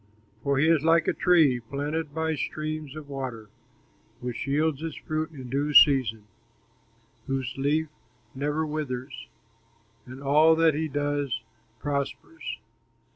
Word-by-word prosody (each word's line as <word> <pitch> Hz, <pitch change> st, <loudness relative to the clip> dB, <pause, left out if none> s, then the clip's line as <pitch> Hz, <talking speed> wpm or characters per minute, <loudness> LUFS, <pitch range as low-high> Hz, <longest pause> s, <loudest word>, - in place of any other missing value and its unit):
For 140 Hz, -1 st, +1 dB
he 150 Hz, +4 st, +3 dB
is 160 Hz, -3 st, +4 dB
like 165 Hz, 0 st, +4 dB
a -, -, +3 dB
tree 160 Hz, -8 st, +4 dB
planted 145 Hz, +6 st, -3 dB
by 160 Hz, +1 st, -1 dB
streams 155 Hz, -1 st, -4 dB
of 155 Hz, -2 st, -8 dB
water, 130 Hz, -6 st, -6 dB, 0.7 s
Which 125 Hz, +2 st, -5 dB
yields 150 Hz, +1 st, +1 dB
its 165 Hz, -2 st, -4 dB
fruit 155 Hz, 0 st, -3 dB
in 135 Hz, -5 st, -9 dB
due 145 Hz, +3 st, -1 dB
season, 125 Hz, -7 st, +6 dB, 1.0 s
Whose 130 Hz, -2 st, -2 dB
leaf 150 Hz, +4 st, +1 dB, 0.5 s
never 150 Hz, +3 st, -1 dB
withers, 140 Hz, -4 st, -5 dB, 0.8 s
And 130 Hz, +1 st, -9 dB
all 155 Hz, +4 st, +5 dB
that 165 Hz, -1 st, +4 dB
he 160 Hz, +2 st, -1 dB
does 145 Hz, -3 st, -2 dB, 0.4 s
prospers. 145 Hz, -, -4 dB
145 Hz, 130 wpm, -27 LUFS, 135-155 Hz, 1.0 s, season